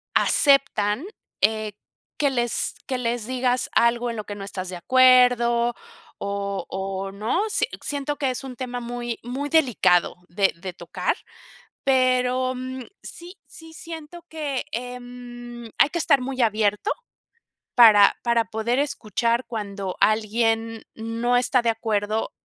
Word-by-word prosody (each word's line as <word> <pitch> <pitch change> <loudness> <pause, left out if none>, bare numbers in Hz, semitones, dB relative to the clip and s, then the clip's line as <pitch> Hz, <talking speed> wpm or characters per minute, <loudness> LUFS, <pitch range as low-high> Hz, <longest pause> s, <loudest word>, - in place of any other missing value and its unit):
aceptan, 275 - +3 0.4
eh, 215 -1 +1 0.4
que 285 - +2
les 240 -2 +1
que 260 - -1
les 235 -2 -2
digas 255 -1 0
algo 235 +1 +3
en 230 - -4
lo 215 - -4
que 205 - -6
no 200 - -7
estás 185 -2 -5
de 180 - -5
acuerdo, 245 +1 +4 0.4
o 200 -1 -3
o 195 0 -4
¿no? 215 - -1
Si - - +2 0.2
siento 290 0 -2
que 275 -3 0
es 255 - -5
un 260 -2 -7
tema 250 -2 -4
muy 240 0 -4
muy 265 +5 -4
delicado 235 - +3
de 195 +2 +2
de 185 -1 -5
tocar, - - -2 0.7
pero, 255 -1 +2
mm, 255 0 -6 0.2
sí 350 +3 -9
sí 325 0 -11
siento 330 +1 -9
que, 290 -4 -3
em, 245 -1 -7
hay 280 - +5
que - - -2
estar 280 -4 +3
muy 260 0 -3
abierto 215 - +1 0.8
para 215 -4 +7
para 235 -1 +2
poder 235 +4 -1
escuchar 235 -3 0
cuando 200 -4 -4
alguien 225 +1 +1
no 230 +2 0
está 245 0 +2
de 235 - +1
acuerdo 220 -1 -1
240 Hz, 140 wpm, -24 LUFS, 215-255 Hz, 0.8 s, para